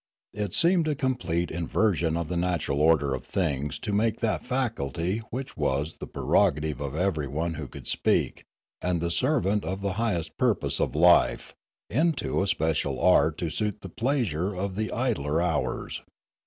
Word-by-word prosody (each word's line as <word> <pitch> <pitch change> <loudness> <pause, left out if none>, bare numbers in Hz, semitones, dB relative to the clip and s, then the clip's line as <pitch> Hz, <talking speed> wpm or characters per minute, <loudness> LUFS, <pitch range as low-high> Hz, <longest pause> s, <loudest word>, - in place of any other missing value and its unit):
It 105 -2 -3
seemed 170 -1 +3
a 150 - +1
com 130 -1 +1
plete 85 -8 -2
inversion 85 0 +1
of 85 -2 -2
the 90 - -3
natural 85 -5 0
order 75 -3 +4
of 65 - -4
things 75 -6 -1
to 105 - -3
make 110 +2 +1
that 110 -2 0
faculty 105 - -1
which 130 +2 -5
was 75 +1 -1
the - - -7
prerogative 75 -1 +1
of 70 0 -4
everyone 80 -2 -1
who 75 -3 -6
could - - -11
speak, - - 0 0.4
and 90 -1 0
the 85 +1 -1
servant 105 - +1
of 95 +1 -3
the 100 -1 -1
highest 85 -9 -2
purpose - - +1
of - - 0
life, 80 -7 +4 0.3
into 155 - +1
a 100 - 0
special 80 -4 0
art - - +4
to - - -2
suit 105 -1 -2
the 95 - -7
pleasure 105 - -1
of 95 +1 -3
the 110 +1 -2
idler 105 - 0
hours. 85 -3 -1
90 Hz, 170 wpm, -27 LUFS, 80-110 Hz, 0.4 s, order